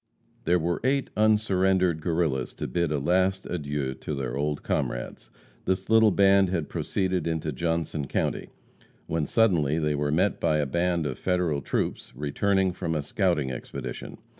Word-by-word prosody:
There 90 Hz, +2 st, +4 dB
were 85 Hz, +1 st, -1 dB
eight 135 Hz, +1 st, +1 dB
unsurrendered 95 Hz, -5 st, +2 dB
Guerrillas 80 Hz, -7 st, -1 dB
to -, -, -4 dB
bid 85 Hz, -3 st, 0 dB
a 75 Hz, -, +1 dB
last 95 Hz, +6 st, +1 dB
adieu 75 Hz, -5 st, -3 dB
to 75 Hz, +2 st, -5 dB
their 65 Hz, -3 st, -3 dB
old 75 Hz, +1 st, -2 dB
comrades. -, -, -3 dB, 0.4 s
This 95 Hz, +3 st, -1 dB
little 110 Hz, -1 st, +6 dB
band 100 Hz, -1 st, +4 dB
had 85 Hz, -5 st, -2 dB
proceeded 95 Hz, -4 st, -1 dB
into 80 Hz, -1 st, -1 dB
Johnson 80 Hz, -1 st, -2 dB
county, -, -, -2 dB, 0.6 s
when 80 Hz, -3 st, -1 dB
suddenly 85 Hz, -10 st, +2 dB
they 75 Hz, -2 st, +1 dB
were 75 Hz, 0 st, -1 dB
met 75 Hz, -, +1 dB
by 75 Hz, -, +2 dB
a 75 Hz, -, +1 dB
band 85 Hz, +3 st, 0 dB
of 65 Hz, -4 st, -4 dB
Federal 90 Hz, -6 st, 0 dB
troops -, -, -2 dB
returning 95 Hz, +6 st, +1 dB
from 80 Hz, -2 st, -3 dB
a 75 Hz, -, -1 dB
scouting 85 Hz, -, 0 dB
expedition. 65 Hz, -, -6 dB
85 Hz, 160 wpm, -26 LUFS, 75-95 Hz, 0.6 s, little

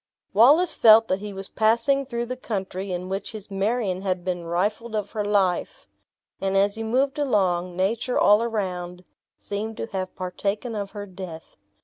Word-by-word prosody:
Wallace 285 Hz, -, +5 dB
felt 225 Hz, 0 st, +7 dB
that 185 Hz, -, +1 dB
he 205 Hz, 0 st, -6 dB
was 195 Hz, 0 st, -7 dB
passing 235 Hz, +5 st, +2 dB
through 235 Hz, -2 st, -2 dB
the 255 Hz, +2 st, -4 dB
country 195 Hz, -5 st, -4 dB
in 180 Hz, 0 st, -3 dB
which 195 Hz, +3 st, -4 dB
his 210 Hz, -2 st, -9 dB
Marion 195 Hz, -1 st, 0 dB
had 185 Hz, -2 st, -2 dB
been 175 Hz, -2 st, -3 dB
rifled 210 Hz, +6 st, -1 dB
of 205 Hz, -1 st, -2 dB
her 215 Hz, -2 st, -2 dB
life; 200 Hz, -3 st, 0 dB, 0.6 s
and 195 Hz, 0 st, +1 dB
as 200 Hz, +1 st, +3 dB
he 225 Hz, -, -5 dB
moved 265 Hz, +6 st, 0 dB
along, 185 Hz, -9 st, +1 dB
nature 225 Hz, +6 st, 0 dB
all 210 Hz, +2 st, +5 dB
around 180 Hz, -6 st, -3 dB, 0.3 s
seemed 215 Hz, +2 st, -5 dB
to -, -, -3 dB
have 185 Hz, -2 st, -4 dB
partaken 200 Hz, +5 st, -3 dB
of 200 Hz, -2 st, -3 dB
her 205 Hz, -1 st, -7 dB
death. 180 Hz, -4 st, -9 dB
205 Hz, 170 wpm, -24 LUFS, 185-225 Hz, 0.6 s, felt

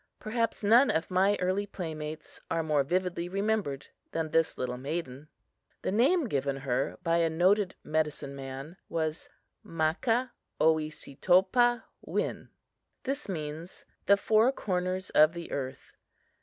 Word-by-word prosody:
Perhaps 230 Hz, 0 st, -2 dB
none 235 Hz, +6 st, +6 dB
of 160 Hz, +3 st, 0 dB
my 195 Hz, +3 st, +3 dB
early 185 Hz, +3 st, 0 dB
playmates 155 Hz, -5 st, -6 dB
are 165 Hz, 0 st, 0 dB
more 150 Hz, -2 st, +2 dB
vividly 175 Hz, +2 st, -1 dB
remembered 195 Hz, -8 st, -1 dB, 0.3 s
than 165 Hz, -1 st, 0 dB
is 155 Hz, -, -9 dB
this 165 Hz, 0 st, +2 dB
little 125 Hz, -1 st, -2 dB
maiden. 140 Hz, 0 st, -5 dB, 0.6 s
The -, -, 0 dB
name 275 Hz, -, +3 dB
given 140 Hz, -6 st, -1 dB
her 125 Hz, -2 st, 0 dB
by 165 Hz, 0 st, +2 dB
a 165 Hz, -1 st, +3 dB
noted 185 Hz, +4 st, +2 dB
medicine 150 Hz, -3 st, -2 dB
man 135 Hz, +5 st, -7 dB
was 160 Hz, -1 st, -2 dB, 0.3 s
Makah 210 Hz, +11 st, 0 dB, 0.3 s
oesetopah 180 Hz, -, +2 dB, 0.2 s
win. -, -, -3 dB, 0.6 s
It 275 Hz, -2 st, -2 dB
means 160 Hz, 0 st, -5 dB, 0.2 s
The 200 Hz, -, +6 dB
four 220 Hz, +4 st, +4 dB
corners 185 Hz, -5 st, -2 dB
of 155 Hz, +2 st, +6 dB
the 170 Hz, -1 st, -7 dB
earth. 130 Hz, -1 st, -5 dB
170 Hz, 130 wpm, -29 LUFS, 155-200 Hz, 0.6 s, none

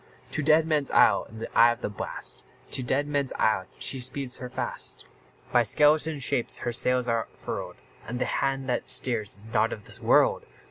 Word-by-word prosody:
To -, -, -1 dB
Deadman's 155 Hz, -1 st, +2 dB
Isle, -, -, +4 dB
in 110 Hz, -, -12 dB
the 115 Hz, -, -8 dB
eye 120 Hz, +1 st, +7 dB
of 120 Hz, +1 st, -6 dB
the -, -, -2 dB
blast, 105 Hz, -, -4 dB, 0.3 s
To -, -, +3 dB
Deadman's 140 Hz, +2 st, -1 dB
Isle, 105 Hz, -4 st, +1 dB
she 135 Hz, -, 0 dB
speeds 130 Hz, +1 st, -2 dB
her 125 Hz, -2 st, -7 dB
fast; -, -, -3 dB, 0.5 s
By 120 Hz, -, +5 dB
skeleton 150 Hz, +6 st, +3 dB
shapes 125 Hz, -2 st, 0 dB
her 120 Hz, -, -3 dB
sails 125 Hz, +1 st, +1 dB
are 115 Hz, -1 st, 0 dB
furled, -, -, -6 dB, 0.3 s
And 125 Hz, -, -4 dB
the 125 Hz, -, -1 dB
hand 135 Hz, -1 st, -1 dB
that 125 Hz, -, -2 dB
steers 110 Hz, -6 st, +1 dB
is 105 Hz, +2 st, -9 dB
not 110 Hz, 0 st, +2 dB
of 105 Hz, -, -7 dB
this -, -, -4 dB
world! -, -, +3 dB
125 Hz, 185 wpm, -26 LUFS, 115-140 Hz, 0.5 s, eye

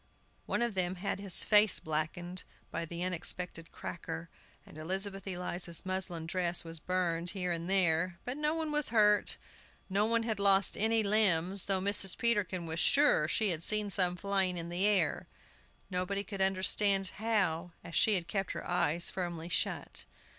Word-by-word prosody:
One -, -, -1 dB
of 235 Hz, -2 st, -2 dB
them 185 Hz, -1 st, -1 dB
had 195 Hz, +2 st, -4 dB
his 195 Hz, -3 st, +3 dB
face 210 Hz, -2 st, +5 dB
blackened 165 Hz, +4 st, -4 dB, 0.3 s
by 165 Hz, 0 st, -4 dB
an 170 Hz, 0 st, -6 dB
unexpected 180 Hz, -1 st, -2 dB
cracker, 165 Hz, 0 st, -7 dB, 0.4 s
and -, -, -16 dB
Elizabeth 195 Hz, +5 st, -4 dB
Eliza's 175 Hz, -2 st, -2 dB
muslin 185 Hz, -3 st, -2 dB
dress 175 Hz, 0 st, +1 dB
was 165 Hz, -1 st, -6 dB
burned 175 Hz, 0 st, -2 dB
here 180 Hz, -1 st, -1 dB
and 170 Hz, +1 st, -4 dB
there. 180 Hz, -2 st, +1 dB
But 250 Hz, -, -4 dB
no 300 Hz, +1 st, 0 dB
one 320 Hz, -2 st, -3 dB
was 300 Hz, -1 st, +1 dB
hurt; 210 Hz, -2 st, +3 dB, 0.5 s
no 205 Hz, +3 st, +1 dB
one 230 Hz, 0 st, +1 dB
had 220 Hz, -3 st, -3 dB
lost 195 Hz, -1 st, +3 dB
any 220 Hz, +1 st, +1 dB
limbs, 200 Hz, -3 st, +3 dB
though 195 Hz, -1 st, +2 dB
Mrs. 195 Hz, -1 st, +3 dB
Peterkin 205 Hz, -7 st, 0 dB
was 165 Hz, +1 st, -4 dB
sure 280 Hz, -, +4 dB
she 210 Hz, +6 st, +1 dB
had 160 Hz, -2 st, -4 dB
seen 210 Hz, +2 st, +3 dB
some 180 Hz, -2 st, +3 dB
flying 190 Hz, -1 st, -1 dB
in 170 Hz, 0 st, -5 dB
the 180 Hz, +4 st, +1 dB
air. 195 Hz, -6 st, 0 dB, 0.6 s
Nobody 190 Hz, +2 st, -2 dB
could 200 Hz, -2 st, -6 dB
understand 195 Hz, +1 st, +3 dB
how, 185 Hz, -6 st, -1 dB
as 170 Hz, -, -11 dB
she 215 Hz, +4 st, +3 dB
had 175 Hz, -2 st, -2 dB
kept 195 Hz, +2 st, -3 dB
her -, -, -7 dB
eyes 170 Hz, +4 st, 0 dB
firmly 175 Hz, -2 st, -5 dB
shut. -, -, -2 dB
185 Hz, 170 wpm, -31 LUFS, 170-205 Hz, 0.6 s, face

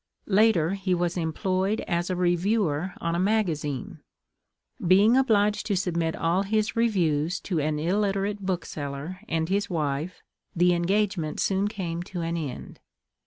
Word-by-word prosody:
Later 195 Hz, -5 st, +3 dB
he 195 Hz, -2 st, 0 dB
was 175 Hz, 0 st, -1 dB
employed 185 Hz, +5 st, -1 dB
as 175 Hz, -1 st, -2 dB
a 185 Hz, -, 0 dB
reviewer 180 Hz, -1 st, 0 dB
on 170 Hz, 0 st, -1 dB
a 170 Hz, -, 0 dB
magazine. 170 Hz, -, -1 dB, 0.8 s
Being 200 Hz, +6 st, +5 dB
obliged 210 Hz, -5 st, +2 dB
to 200 Hz, -3 st, +1 dB
submit 170 Hz, -3 st, -1 dB
all 170 Hz, +3 st, +1 dB
his 210 Hz, +2 st, 0 dB
reviews 175 Hz, -8 st, +1 dB
to 175 Hz, -5 st, -2 dB
an 150 Hz, +1 st, 0 dB
illiterate 200 Hz, +4 st, 0 dB
bookseller 165 Hz, -2 st, -4 dB
and 160 Hz, 0 st, 0 dB
his 200 Hz, +4 st, 0 dB
wife, 155 Hz, 0 st, -2 dB, 0.3 s
the 175 Hz, +1 st, +4 dB
engagement 175 Hz, -2 st, 0 dB
soon 195 Hz, +1 st, +1 dB
came 175 Hz, -5 st, -4 dB
to 180 Hz, -1 st, -6 dB
an 165 Hz, 0 st, -2 dB
end. 150 Hz, -6 st, -6 dB
180 Hz, 140 wpm, -26 LUFS, 165-200 Hz, 0.8 s, Being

